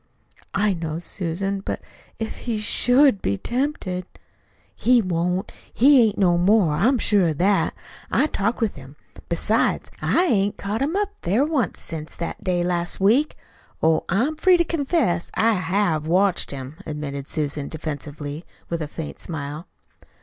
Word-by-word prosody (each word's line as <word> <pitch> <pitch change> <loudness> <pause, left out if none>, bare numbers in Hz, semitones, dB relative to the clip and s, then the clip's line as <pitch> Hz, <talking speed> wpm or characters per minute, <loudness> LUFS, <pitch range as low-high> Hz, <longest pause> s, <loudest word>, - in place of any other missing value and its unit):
"I 205 0 +2
know, 165 -2 -4
Susan; 190 +3 -2
but 195 - -4 0.4
if 220 -1 -4
he 235 -3 -3
SHOULD 245 +2 +4
be 100 - 0
tempted 235 - -2 0.4
" - - -37
"He 245 +1 +6
won't. 180 -1 -1 0.2
He 270 +2 +6
ain't 220 -3 +2
no 175 -3 +3
more. 185 -3 +4
I'm 240 - +3
sure 205 -5 +2
of 155 -3 -1
that. 195 +4 +2 0.3
I - - +3
talked 230 -5 -1
with 220 -3 +1
him. 135 +1 -12 0.3
Besides, 215 +6 +1
I 360 - +3
hain't 205 - +1
caught 210 +4 -3
him 300 +6 0
up 410 0 0
there 210 +11 +2
once 290 - -1
since 155 -1 -5
that 170 - -5
day 180 -3 +1
last 175 -1 -1
week. 235 +11 +3 0.5
Oh, 160 0 +3
I'm 240 - +1
free 365 +2 +5
to 340 - +2
confess 280 - 0
I 225 +1 +3
HAVE 180 -4 0
watched 185 +2 +2
him," 135 +2 -7
admitted 140 -2 -5
Susan 145 -2 -2
defensively, 150 0 -6 0.3
with 170 -1 -1
a 150 - -2
faint 155 +1 -7
smile. 150 +1 -6
185 Hz, 155 wpm, -23 LUFS, 160-230 Hz, 0.5 s, He